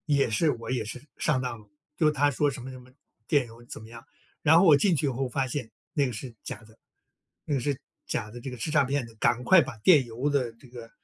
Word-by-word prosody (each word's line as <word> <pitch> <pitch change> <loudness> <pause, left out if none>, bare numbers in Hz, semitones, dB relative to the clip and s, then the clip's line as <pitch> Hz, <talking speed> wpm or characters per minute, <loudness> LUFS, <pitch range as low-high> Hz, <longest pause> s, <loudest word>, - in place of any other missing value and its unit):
也 140 -4 +3
是 150 +8 +2
我 115 -2 -6
也 125 -3 0
是， 120 +4 -7 0.2
上 130 -4 +1
当 125 -3 -4
了， 105 - -19 0.3
就 155 -3 +4
他 145 0 +2
说 145 +2 +1
什 135 -2 -7
么 130 - -7
什 130 - -10
么， 125 +1 -17 0.4
电 140 -5 +2
邮 115 +1 -14
怎 - - -9
么 110 - -12
样。 115 0 -11 0.4
然 160 +2 +6
后 190 - +5
我 155 -4 +8
进 180 +4 +3
去 150 - 0
以 - - +2
后 130 0 -2
发 135 +2 0
现 125 -2 -4 0.2
那 145 -5 +2
个 125 - -5
是 120 +2 -7
假 - - -7
的 110 +1 -19 0.7
那 150 - -2
个 140 - +2
是 135 +1 -2 0.3
假 105 -3 -2
的， 120 - -9
这 135 - -5
个 125 - -8
是 120 +7 -3
诈 150 -2 +4
骗 135 0 -1
的， 115 -1 -15
赶 120 +3 +1
快 180 +7 +7
把 130 -5 -5
电 145 - +6
邮 120 +5 -2
的 135 -5 0
这 115 +3 -18
个， 120 -2 -10
130 Hz, 290 characters per minute, -27 LUFS, 115-145 Hz, 0.7 s, 我